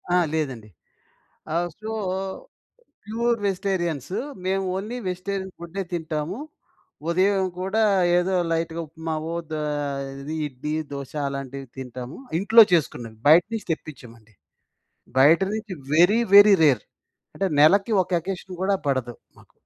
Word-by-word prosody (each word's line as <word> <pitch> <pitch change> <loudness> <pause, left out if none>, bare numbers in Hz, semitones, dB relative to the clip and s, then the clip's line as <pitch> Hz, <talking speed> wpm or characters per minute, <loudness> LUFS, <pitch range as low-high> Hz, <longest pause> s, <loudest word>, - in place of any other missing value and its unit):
ఆ! - - +5 0.2
లేదండి. 130 -9 -3 0.9
ఆహ్, 175 +1 0
సో, 215 +1 -5 1.1
ప్యూర్ 235 +2 0
వెజిటేరియన్స్ 180 -6 -2 0.3
మేము 195 +1 0
ఓన్లీ 215 +6 -4
వెజిటేరియన్ 190 +1 -4
ఫుడ్డే 170 +3 -5
తింటాము. 160 +2 -3 0.7
ఉదయం 190 +2 +2
కూడా 195 +4 0 0.4
ఏదో 185 +2 0 0.2
లైట్‌‌గా 165 0 -2
ఉప్మావో, 160 +1 -4 0.2
ద - - -1 0.7
ఇది 150 +3 -5
ఇడ్లీ, 145 +2 -5 0.2
దోస 140 -2 -6 0.2
అలాంటివి 135 0 -6
తింటాము. 125 0 -7 0.2
ఇంట్లో 220 +3 +8
చేసుకున్నది, 120 -8 0
బయట 160 +4 +8
నుంచి 220 - -5
తెప్పించమండి. 115 -9 -10 0.8
బయట 150 +6 +6
నుంచి 215 -2 -5 0.2
వెరీ, 180 +8 +5 0.2
వెరీ 205 0 +9
రేర్. 135 -8 +4 0.5
అంటే, 195 - 0
నెలకి 195 +8 +5
ఒక - - -23
అకేషన్ 185 0 -6
కూడా 195 +1 +2
పడదు 130 -3 -1 0.2
మాకు. - - -21
170 Hz, 120 wpm, -24 LUFS, 140-195 Hz, 1.1 s, వెరీ